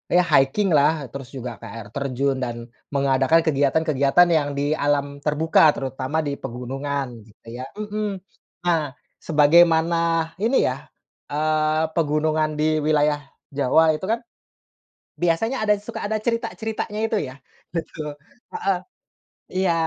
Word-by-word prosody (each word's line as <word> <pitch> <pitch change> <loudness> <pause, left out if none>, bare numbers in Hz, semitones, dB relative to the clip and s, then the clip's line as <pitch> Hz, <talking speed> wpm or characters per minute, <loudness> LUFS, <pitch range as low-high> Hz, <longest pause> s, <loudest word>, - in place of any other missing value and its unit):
ya 180 - +6
hiking-lah. 150 - +3
Terus 135 -3 -8
juga 125 -4 -6
ke - - -11
air 115 0 -8
terjun 140 -1 -1
dan 120 -1 -5 0.2
mengadakan 140 +3 +3
kegiatan-kegiatan 145 +2 +3
yang 155 -4 +2
di 145 +1 0
alam 145 -1 0
terbuka, 155 0 +4
terutama 135 +3 -2
di 140 -1 -3
pegunungan, 135 +3 -4 0.2
gitu 110 +1 -23
ya 125 +2 -6
mhm. 210 -2 -4 0.4
Nah, 160 -6 +1 0.3
sebagaimana 165 +2 +4 0.4
ini 235 +5 +3
ya, - - -3 0.4
eee, 155 +1 +1
pegunungan 155 0 +1
di 155 0 +1
wilayah 150 -1 +2 0.3
Jawa 150 +4 +4
itu 155 +5 -4
kan, 230 +1 0 1.0
biasanya 195 +9 0
ada, 210 -1 +4
suka 205 - -7
ada 215 +1 -1
cerita-ceritanya 220 -2 -3
itu, 225 - 0
ya. 130 - -13 0.4
Betul. 155 -3 -5 0.4
Heeh. 195 -2 0 0.8
Iya, 185 -2 +2
155 Hz, 125 wpm, -23 LUFS, 140-170 Hz, 1.0 s, ya